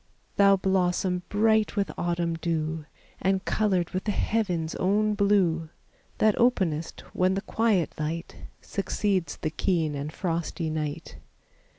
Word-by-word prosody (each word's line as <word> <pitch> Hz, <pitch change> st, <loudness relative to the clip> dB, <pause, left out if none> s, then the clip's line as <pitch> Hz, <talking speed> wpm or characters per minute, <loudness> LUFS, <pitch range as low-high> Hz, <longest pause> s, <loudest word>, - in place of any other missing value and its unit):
Thou 200 Hz, -1 st, +6 dB
blossom 185 Hz, -1 st, +1 dB
bright 220 Hz, +1 st, +2 dB
with 200 Hz, -6 st, 0 dB
autumn 170 Hz, -1 st, -1 dB
dew, 160 Hz, -1 st, -2 dB, 0.4 s
And 190 Hz, 0 st, +1 dB
colored 190 Hz, -5 st, +1 dB
with 185 Hz, 0 st, -3 dB
the 210 Hz, -, +1 dB
heaven's 180 Hz, -7 st, -1 dB
own 210 Hz, +3 st, +2 dB
blue, 190 Hz, -6 st, +2 dB, 0.5 s
That 215 Hz, -1 st, +4 dB
openest 180 Hz, -10 st, +1 dB
when 185 Hz, +1 st, +2 dB
the 195 Hz, -, -1 dB
quiet 215 Hz, -5 st, +1 dB
light 160 Hz, +3 st, -3 dB, 0.3 s
Succeeds 195 Hz, -2 st, -1 dB
the 155 Hz, -, -3 dB
keen 160 Hz, -2 st, 0 dB
and 145 Hz, +1 st, -4 dB
frosty 165 Hz, -1 st, -2 dB
night. 155 Hz, 0 st, -4 dB
180 Hz, 125 wpm, -27 LUFS, 165-200 Hz, 0.5 s, Thou